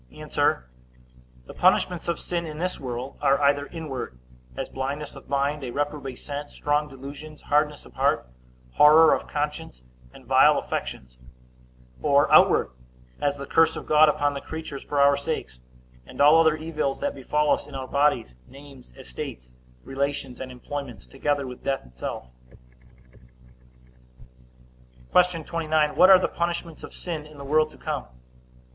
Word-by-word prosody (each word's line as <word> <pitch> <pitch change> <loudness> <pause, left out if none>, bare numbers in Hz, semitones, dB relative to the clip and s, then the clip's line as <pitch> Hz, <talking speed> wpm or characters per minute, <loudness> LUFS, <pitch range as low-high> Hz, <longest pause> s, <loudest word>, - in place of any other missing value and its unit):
A. - - -10 1.2
The - - -11
punishments 175 -2 +2
of 170 - -1
sin 170 -1 -3
in 155 -1 -7
this 180 +3 -3
world 125 0 -6
are 140 -1 +3
either 145 0 +2
inward, 135 - -6 0.4
as - - -3
blindness 140 +3 -5
of - - -13
mind, 140 +1 0
a 125 - -4
reprobate 145 -1 -3
sense, 145 0 -7
strong 150 0 0
delusions, 145 +3 -10
hardness 150 0 0
of - - -16
heart, - - +1 0.4
horror 155 - +7
of - - -2
conscience, 150 - -4 0.3
and - - -16
vile - - +5
affections; 60 0 -5 0.8
or 140 +1 +3
outward, - - +5 0.5
as 145 0 0
the 140 - -6
curse 165 +2 +3
of - - -7
God 155 0 +6
upon 145 -1 +1
the 140 - -5
creatures 160 -3 -7
for 145 - -2
our 140 0 +6
sakes, 140 - -4 0.5
and - - -12
all 150 +3 +7
other 160 -1 +4
evils 155 -3 -3
that - - -2
befall 150 +3 0
us - - -3
in 145 - -10
our 130 -1 -5
bodies, 140 - +1
names, 135 - -15
estates, 60 0 -8 0.3
relations, 140 -1 -3
and 130 -1 -6
employments; 125 - -7
together 145 - -2
with 125 -1 -9
death 135 -1 -2
itself. 60 +1 -6 2.9
Q. 180 -2 +3
29. 155 -2 0
What 185 - +7
are 190 - +10
the 185 - 0
punishments 170 -1 -4
of - - -8
sin 160 -4 -5
in 150 -1 -15
the 140 - -9
world 155 +2 +2
to - - -17
come? - - -4
145 Hz, 155 wpm, -25 LUFS, 135-155 Hz, 2.9 s, are